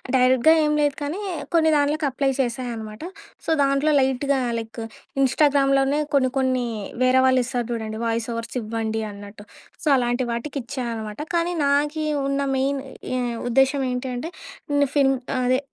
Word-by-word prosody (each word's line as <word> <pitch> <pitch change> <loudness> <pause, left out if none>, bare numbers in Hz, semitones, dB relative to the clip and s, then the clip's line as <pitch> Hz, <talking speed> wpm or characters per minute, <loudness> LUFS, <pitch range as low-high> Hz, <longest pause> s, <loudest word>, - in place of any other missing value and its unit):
డైరెక్ట్‌గా 255 +4 +5
ఏం 300 - +2
లేదు, 290 -2 +2
కానీ 295 +7 -3 0.3
కొన్ని 320 -1 +4
దాన్లకు 295 +1 +1
అప్లై 270 +1 0
చేశా 250 -1 -1
అనమాట. 220 +2 -8 0.4
సో, - - -4
దాంట్లో 275 +2 +2
లైట్‌గా 265 +1 +1 0.2
లైక్ 225 0 -7 0.4
ఇంస్టాగ్రామ్‌లోనే 275 0 +3
కొన్ని 265 -2 +3
కొన్ని 260 -2 +1 0.4
వేరే 255 +1 +4
వాళ్ళిస్తారు 255 -1 +1
జూడండి, 220 -2 -3
వాయిసోవర్స్ 230 +1 -3
ఇవ్వండి 220 0 -2
అన్నట్టు. 205 +1 -11 0.4
సో, - - -4
అలాంటి 245 0 +1
వాటికిచ్చానమాట, 235 -4 -4 0.2
కానీ 340 +1 +1
నాకీ 295 +2 +1 0.2
ఉన్న 275 0 0 0.2
మెయిన్ 275 +1 0 0.4
ఎ - - 0 0.3
ఉద్దేశ్యం 270 +3 +3
ఏంటి 250 +1 -3
అంటే, 310 +8 -5 0.4
నిన్ను 285 0 +3
ఫిల్మ్ 270 -2 +4 0.2
ఆహ్, 255 - 0
అదే. 255 +1 +3
260 Hz, 140 wpm, -23 LUFS, 235-280 Hz, 0.4 s, డైరెక్ట్‌గా